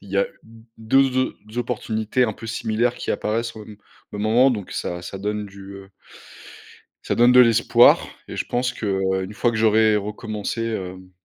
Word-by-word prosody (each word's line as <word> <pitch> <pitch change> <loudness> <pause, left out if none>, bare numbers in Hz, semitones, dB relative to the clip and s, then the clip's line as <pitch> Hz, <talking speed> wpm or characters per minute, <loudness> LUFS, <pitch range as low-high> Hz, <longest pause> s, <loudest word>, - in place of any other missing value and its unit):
il 100 - -15
y 100 - -2
a 100 - +3 0.2
d 115 0 -17 0.2
deux 130 +3 +2 0.2
o - - -1
opportunités 115 0 -1
un 110 - -1
peu 115 - -10
similaires 115 +2 -1
qui - - -5
apparaissent 115 +1 -2
au 110 - -9
m 105 0 -12 0.4
au 105 - -6
moment 115 +6 +4
donc 105 -5 -6
ça 90 0 -4
ça 95 +2 -7
donne 105 +1 -3
du, 100 0 -12
heu 95 0 -12 1.2
ça - - 0
donne 120 +1 +5
de 125 - +8
l'espoir 120 0 +5 0.3
et - - -7
je - - -3
pense 125 0 -1
qu'une 95 -2 -2
fois 120 +2 +1
que 115 - -3
j'aurai 110 0 +4
recommencé, 105 +2 -4
hem, 95 -4 -5
110 Hz, 185 wpm, -22 LUFS, 100-120 Hz, 1.2 s, de